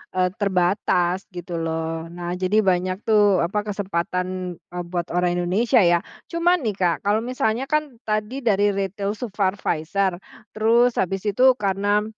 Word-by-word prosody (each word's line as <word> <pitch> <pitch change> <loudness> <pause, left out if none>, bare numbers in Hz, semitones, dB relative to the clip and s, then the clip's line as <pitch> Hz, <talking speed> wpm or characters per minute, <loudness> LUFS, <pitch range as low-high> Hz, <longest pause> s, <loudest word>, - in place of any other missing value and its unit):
eee, 185 0 +3
terbatas 180 -1 +1
gitu 175 -1 -6
loh. 165 0 -3
Nah, 175 0 -4
jadi 195 +4 +2
banyak 185 +1 0
tuh, 205 -3 +4
apa, 205 +4 -1
kesempatan, 180 -1 -3
eee, 175 +1 -7
buat 175 -1 -2
orang 175 0 +1
Indonesia 220 +8 +2
ya. 170 0 +4 0.3
Cuma 340 +2 +3
nih, 215 -7 -2
Kak, 175 -3 0
kalau 205 +2 +2
misalnya 245 -1 -1
kan, 305 -4 -1
tadi 215 +5 -1
dari 205 -2 +3
retail 200 +1 -2
supervisor, 195 -4 -1 0.4
terus 235 +3 +3
habis 190 +1 -1
itu 255 +5 +4
karena, 205 0 +1
195 Hz, 145 wpm, -23 LUFS, 175-215 Hz, 0.4 s, tuh